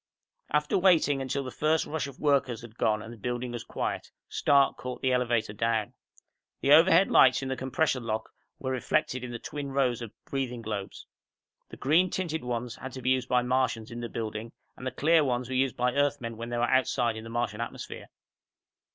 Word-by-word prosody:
After 150 Hz, +4 st, +2 dB
waiting 165 Hz, -7 st, +4 dB
until 135 Hz, +1 st, -2 dB
the 130 Hz, -, -6 dB
first 155 Hz, +4 st, +1 dB
rush 155 Hz, -2 st, -3 dB
of 140 Hz, -, -10 dB
workers 135 Hz, -6 st, +1 dB
had 115 Hz, -2 st, -12 dB
gone 105 Hz, -2 st, +1 dB
and 115 Hz, -, -9 dB
the -, -, -12 dB
building 120 Hz, +2 st, -3 dB
was 120 Hz, -1 st, -5 dB
quiet, -, -, -3 dB, 0.2 s
Stark 140 Hz, -1 st, +3 dB
caught 125 Hz, 0 st, -7 dB
the 130 Hz, -, +3 dB
elevator 120 Hz, -4 st, +1 dB
down. 110 Hz, 0 st, 0 dB, 0.7 s
The 140 Hz, -, +2 dB
overhead 170 Hz, +4 st, +7 dB
lights 130 Hz, +1 st, +6 dB
in 135 Hz, -, -3 dB
the 130 Hz, -, -1 dB
compressor 130 Hz, +1 st, 0 dB
lock 110 Hz, -2 st, -3 dB, 0.3 s
were 130 Hz, -, -3 dB
reflected 130 Hz, 0 st, 0 dB
in 125 Hz, -, -5 dB
the 120 Hz, -, -5 dB
twin 145 Hz, +3 st, -6 dB
rows 130 Hz, -3 st, +1 dB
of 115 Hz, -3 st, -6 dB
breathing 125 Hz, -4 st, -3 dB
globes. 105 Hz, -3 st, -5 dB, 0.6 s
The -, -, -10 dB
green 165 Hz, +7 st, +3 dB
tinted 165 Hz, -6 st, -2 dB
ones 120 Hz, -1 st, -3 dB
had 130 Hz, -1 st, -8 dB
to 130 Hz, -, -7 dB
be 130 Hz, -, +2 dB
used 130 Hz, -1 st, 0 dB
by 125 Hz, -1 st, +3 dB
Martians 125 Hz, -3 st, 0 dB
in 120 Hz, -, -6 dB
the 120 Hz, -, -4 dB
building, 110 Hz, 0 st, -5 dB, 0.2 s
and 130 Hz, -, -6 dB
the -, -, -1 dB
clear 155 Hz, +5 st, +4 dB
ones 125 Hz, -2 st, -1 dB
were -, -, -3 dB
used 130 Hz, -1 st, +1 dB
by 125 Hz, 0 st, +1 dB
Earthmen 140 Hz, -5 st, 0 dB
when 115 Hz, +1 st, -6 dB
they 120 Hz, -, -2 dB
were 120 Hz, -, +1 dB
outside 120 Hz, -2 st, +2 dB
in 110 Hz, -, -7 dB
the 115 Hz, -, -9 dB
Martian 115 Hz, -2 st, -2 dB
atmosphere. 115 Hz, -, -6 dB
125 Hz, 205 wpm, -28 LUFS, 115-140 Hz, 0.7 s, overhead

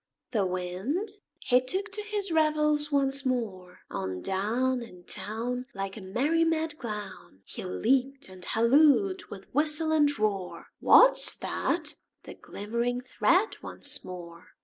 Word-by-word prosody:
The 205 Hz, -6 st, +1 dB
Wind, 185 Hz, -, -2 dB, 0.3 s
he 250 Hz, 0 st, +4 dB
took 380 Hz, +11 st, -3 dB
to 420 Hz, +2 st, -4 dB
his 410 Hz, -2 st, -3 dB
revels 300 Hz, -1 st, +2 dB
once 275 Hz, -1 st, +2 dB
more; 205 Hz, -9 st, -3 dB
On 95 Hz, -1 st, -3 dB
down 235 Hz, +7 st, 0 dB
In 180 Hz, -7 st, -11 dB
town, 230 Hz, +7 st, -4 dB
Like 195 Hz, 0 st, -4 dB
a 215 Hz, -, -8 dB
merry 275 Hz, +13 st, +1 dB
mad 320 Hz, -2 st, 0 dB
clown, 210 Hz, -, -7 dB
He -, -, -7 dB
leaped 260 Hz, +8 st, 0 dB
and 185 Hz, -1 st, -11 dB
hallooed 300 Hz, -, +4 dB
with 195 Hz, -1 st, -11 dB
whistle 305 Hz, +2 st, +2 dB
and 300 Hz, -2 st, +4 dB
roar, 200 Hz, -4 st, -2 dB
"What's -, -, +6 dB
that?" -, -, -2 dB, 0.3 s
The -, -, -9 dB
glimmering 235 Hz, +4 st, -3 dB
thread 375 Hz, -, +1 dB
once -, -, -2 dB
more! 170 Hz, -1 st, -9 dB
250 Hz, 135 wpm, -28 LUFS, 195-305 Hz, 0.3 s, What's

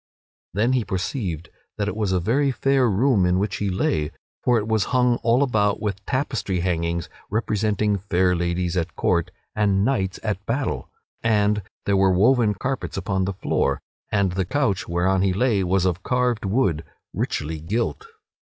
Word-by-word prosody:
Then 115 Hz, +5 st, +2 dB
he 125 Hz, -3 st, +2 dB
perceived 90 Hz, -, -3 dB, 0.3 s
that 100 Hz, -1 st, -1 dB
it 105 Hz, -, -2 dB
was 105 Hz, -3 st, -1 dB
a 95 Hz, -, +2 dB
very 130 Hz, +10 st, +2 dB
fair 135 Hz, -1 st, +2 dB
room 110 Hz, 0 st, +3 dB
in 90 Hz, 0 st, +3 dB
which 100 Hz, 0 st, -1 dB
he 100 Hz, -, -1 dB
lay, 80 Hz, -5 st, 0 dB, 0.3 s
for 120 Hz, -1 st, +3 dB
it 105 Hz, -1 st, -1 dB
was 110 Hz, -3 st, +1 dB
hung 125 Hz, -2 st, +2 dB
all 120 Hz, +4 st, +3 dB
about 105 Hz, -6 st, +1 dB
with 100 Hz, -2 st, -3 dB
tapestry 125 Hz, -9 st, -1 dB
hangings 85 Hz, -1 st, -1 dB, 0.2 s
representing 105 Hz, -1 st, 0 dB
fair 90 Hz, -2 st, +1 dB
ladies 85 Hz, 0 st, -1 dB
at 85 Hz, -3 st, -2 dB
court 85 Hz, 0 st, +1 dB, 0.3 s
and 100 Hz, -2 st, +2 dB
knights 95 Hz, -8 st, 0 dB
at 105 Hz, -3 st, -2 dB
battle. 115 Hz, -, -2 dB, 0.3 s
And 105 Hz, -2 st, +2 dB, 0.2 s
there 100 Hz, -1 st, +2 dB
were 95 Hz, 0 st, +4 dB
woven 110 Hz, +3 st, +3 dB
carpets 130 Hz, +1 st, -3 dB
upon 95 Hz, 0 st, -1 dB
the 100 Hz, -, -2 dB
floor, 70 Hz, -6 st, 0 dB, 0.3 s
and 100 Hz, -3 st, +2 dB
the 95 Hz, +2 st, 0 dB
couch 130 Hz, -3 st, 0 dB
whereon 90 Hz, +2 st, +1 dB
he 95 Hz, -1 st, +2 dB
lay 105 Hz, -1 st, +2 dB
was 95 Hz, +1 st, +1 dB
of 90 Hz, -1 st, 0 dB
carved 125 Hz, -1 st, 0 dB
wood, 95 Hz, -, +1 dB, 0.3 s
richly 80 Hz, +1 st, -2 dB
gilt. 115 Hz, -, -2 dB
100 Hz, 170 wpm, -23 LUFS, 90-115 Hz, 0.3 s, were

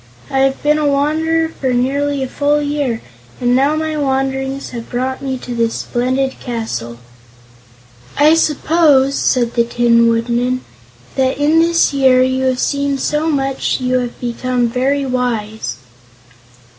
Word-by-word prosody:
I 270 Hz, -, +1 dB
have 270 Hz, 0 st, +1 dB
been 300 Hz, +1 st, +3 dB
a 300 Hz, -, +1 dB
wanderer 315 Hz, +3 st, +1 dB
for 265 Hz, -5 st, -3 dB
nearly 275 Hz, +3 st, 0 dB
a -, -, -3 dB
full 290 Hz, +3 st, +1 dB
year, 285 Hz, -5 st, -2 dB, 0.4 s
and 245 Hz, 0 st, +2 dB
now 280 Hz, +4 st, +2 dB
my 315 Hz, 0 st, -2 dB
wanderings 270 Hz, -1 st, -2 dB
have 235 Hz, -2 st, -7 dB
brought 260 Hz, +2 st, -3 dB
me 265 Hz, -1 st, -3 dB
to 250 Hz, -1 st, -7 dB
this 230 Hz, -1 st, 0 dB
splendid 260 Hz, +2 st, -1 dB
castle." 170 Hz, -, -5 dB, 1.2 s
"I 300 Hz, +2 st, +5 dB
suppose," 300 Hz, -3 st, +3 dB
said 240 Hz, -4 st, +1 dB
the 235 Hz, -, +3 dB
Tin 235 Hz, 0 st, +3 dB
Woodman, 240 Hz, +2 st, 0 dB, 0.6 s
"that 260 Hz, 0 st, +1 dB
in 300 Hz, +3 st, +3 dB
this 335 Hz, -2 st, +3 dB
year 260 Hz, -2 st, +4 dB
you 260 Hz, 0 st, 0 dB
have 260 Hz, -1 st, +1 dB
seen 280 Hz, -1 st, 0 dB
so 300 Hz, +4 st, -1 dB
much 270 Hz, -3 st, -1 dB
that 260 Hz, -, -8 dB
you 255 Hz, 0 st, +1 dB
have 245 Hz, -1 st, -5 dB
become 245 Hz, 0 st, -1 dB
very 270 Hz, +4 st, 0 dB
wise." 220 Hz, -, -2 dB
265 Hz, 150 wpm, -16 LUFS, 245-285 Hz, 1.2 s, I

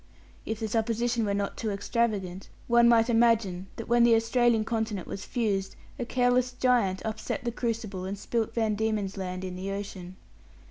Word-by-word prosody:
If 220 Hz, -1 st, -3 dB
the 220 Hz, -, -2 dB
supposition 230 Hz, +1 st, 0 dB
were 200 Hz, -1 st, 0 dB
not 200 Hz, 0 st, -2 dB
too 220 Hz, -, -2 dB
extravagant, 200 Hz, -3 st, -1 dB, 0.2 s
one 235 Hz, 0 st, +5 dB
might 230 Hz, -1 st, +5 dB
imagine 225 Hz, -6 st, +2 dB
that 230 Hz, -, -7 dB
when 240 Hz, 0 st, +4 dB
the 235 Hz, -1 st, +6 dB
Australian 230 Hz, 0 st, +2 dB
continent 220 Hz, -5 st, -2 dB
was 195 Hz, -, -6 dB
fused, 200 Hz, -5 st, -1 dB, 0.2 s
a 245 Hz, -, -2 dB
careless 250 Hz, 0 st, +2 dB
giant 240 Hz, -7 st, +1 dB
upset 220 Hz, +4 st, -3 dB
the 240 Hz, -, -1 dB
crucible, 225 Hz, -6 st, -3 dB
and 195 Hz, +2 st, -4 dB
spilt 225 Hz, +2 st, -2 dB
Van 220 Hz, -2 st, +1 dB
Diemen's 210 Hz, -2 st, -1 dB
land 185 Hz, -1 st, -4 dB
in 180 Hz, -1 st, -5 dB
the 185 Hz, +2 st, -5 dB
ocean. 195 Hz, -2 st, -6 dB
220 Hz, 175 wpm, -28 LUFS, 195-235 Hz, 0.2 s, the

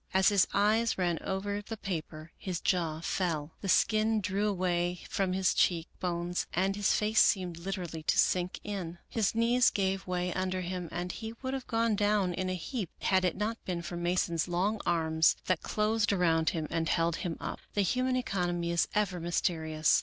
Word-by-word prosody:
As 190 Hz, +2 st, +6 dB
his 200 Hz, -3 st, +4 dB
eyes 220 Hz, +3 st, +2 dB
ran 175 Hz, -3 st, 0 dB
over 200 Hz, +2 st, -2 dB
the 220 Hz, +2 st, -7 dB
paper, 160 Hz, -4 st, -5 dB
his 180 Hz, -3 st, -4 dB
jaw 165 Hz, -4 st, 0 dB
fell. 165 Hz, -4 st, -1 dB
The 195 Hz, -, -3 dB
skin 220 Hz, +3 st, +3 dB
drew 200 Hz, +1 st, 0 dB
away 180 Hz, -2 st, 0 dB
from 190 Hz, -2 st, 0 dB
his 190 Hz, 0 st, +2 dB
cheek 170 Hz, -2 st, +2 dB
bones 175 Hz, 0 st, -2 dB
and 190 Hz, +2 st, +1 dB
his 205 Hz, 0 st, +2 dB
face 215 Hz, +1 st, +2 dB
seemed 180 Hz, -4 st, +3 dB
literally 175 Hz, -3 st, -4 dB
to 155 Hz, -, +1 dB
sink 180 Hz, 0 st, +2 dB
in. 185 Hz, -5 st, -5 dB
His 225 Hz, -2 st, 0 dB
knees 235 Hz, +2 st, +4 dB
gave 190 Hz, -1 st, -1 dB
way 180 Hz, -1 st, -1 dB
under 185 Hz, 0 st, -1 dB
him 180 Hz, -1 st, -4 dB
and 175 Hz, +1 st, -3 dB
he 225 Hz, 0 st, -6 dB
would 260 Hz, 0 st, -2 dB
have 265 Hz, -2 st, -4 dB
gone 230 Hz, -1 st, +1 dB
down 205 Hz, -3 st, +2 dB
in 185 Hz, +1 st, -2 dB
a 185 Hz, -, -1 dB
heap 195 Hz, -, -4 dB
had 190 Hz, -1 st, +3 dB
it 180 Hz, -3 st, 0 dB
not 220 Hz, +3 st, -2 dB
been 175 Hz, -2 st, -3 dB
for 175 Hz, -, -5 dB
Mason's 175 Hz, -1 st, 0 dB
long 195 Hz, +5 st, 0 dB
arms 160 Hz, -1 st, +3 dB
that 185 Hz, -3 st, +1 dB
closed 215 Hz, 0 st, +1 dB
around 165 Hz, -4 st, +3 dB
him 160 Hz, -2 st, -2 dB
and 165 Hz, -1 st, 0 dB
held 165 Hz, 0 st, +1 dB
him 170 Hz, -3 st, -3 dB
up. -, -, -5 dB, 0.2 s
The 205 Hz, -, +3 dB
human 255 Hz, +6 st, +1 dB
economy 175 Hz, -8 st, -1 dB
is 170 Hz, -1 st, +2 dB
ever 200 Hz, -4 st, +1 dB
mysterious. 160 Hz, -2 st, +1 dB
185 Hz, 190 wpm, -30 LUFS, 170-205 Hz, 0.2 s, As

